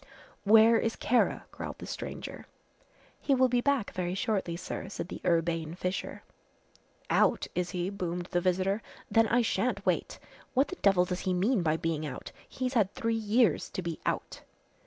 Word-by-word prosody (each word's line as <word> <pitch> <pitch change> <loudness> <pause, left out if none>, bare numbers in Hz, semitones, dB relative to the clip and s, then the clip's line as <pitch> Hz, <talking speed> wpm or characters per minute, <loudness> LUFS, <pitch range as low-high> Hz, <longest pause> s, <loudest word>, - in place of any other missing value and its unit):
"Where 225 +2 +7
is 225 - -1
Kara?" 245 +1 +1
growled - - -6
the - - -8
stranger. - - -6 0.7
"He 275 - +2
will 260 0 +4
be 245 0 +2
back 275 -5 +1
very 180 0 -2
shortly, 190 -4 -1
sir," 190 +2 -5
said 185 - -5
the - - -7
urbane 165 -1 0
Fisher. 180 +1 -4 0.9
"Out, - - +3
is 180 0 -1
he?" 180 +1 -2
boomed 180 -3 -3
the 175 - +1
visitor. 190 +3 +1 0.3
"Then 225 -1 +5
I 240 +2 +3
shan't - - 0
wait. - - 0 0.4
What 270 +3 +3
the 370 - -5
devil 195 -3 +4
does 180 0 -3
he 180 - +2
mean 205 +4 +2
by 160 -1 +1
being 165 -2 -2
out? 145 -4 -6 0.2
He's 255 0 -3
had 210 -6 +2
three 230 0 0
years 225 -3 +2
to 185 - -5
be 170 -2 -4
out!" - - -3
190 Hz, 175 wpm, -30 LUFS, 175-225 Hz, 0.9 s, Where